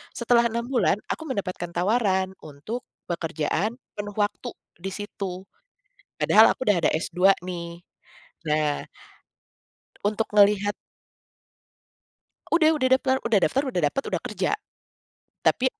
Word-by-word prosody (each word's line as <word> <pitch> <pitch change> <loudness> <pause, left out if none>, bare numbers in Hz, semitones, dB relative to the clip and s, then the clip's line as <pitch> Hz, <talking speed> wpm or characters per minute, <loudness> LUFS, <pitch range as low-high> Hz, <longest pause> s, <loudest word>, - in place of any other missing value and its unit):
setelah 235 0 +3
6 235 +1 -3
bulan 250 -6 +2 0.2
aku 320 - -3
mendapatkan 185 -8 -3
tawaran 190 0 +1
untuk 155 - -7 0.3
pekerjaan 170 +5 -1 0.2
penuh 205 0 -5
waktu 210 +3 -1 0.3
disitu, 195 -1 -5 0.8
padahal - - +6
aku - - -4
udah 205 -4 +4
ada - - +3
S2 180 +4 +3
nih, 170 -1 -6 0.7
nah 150 -1 +1 1.2
Untuk 215 +1 -1
ngelihat 205 0 +4 1.8
Udah 320 -2 +5
udah 260 -2 +2
daftar 260 0 +3
udah 220 -3 +4
daftar 270 - 0
udah 180 - -1
dapet 275 - -1
udah - - -1
kerja, - - -1 0.9
tapi. 260 - +3
205 Hz, 115 wpm, -25 LUFS, 175-235 Hz, 1.8 s, padahal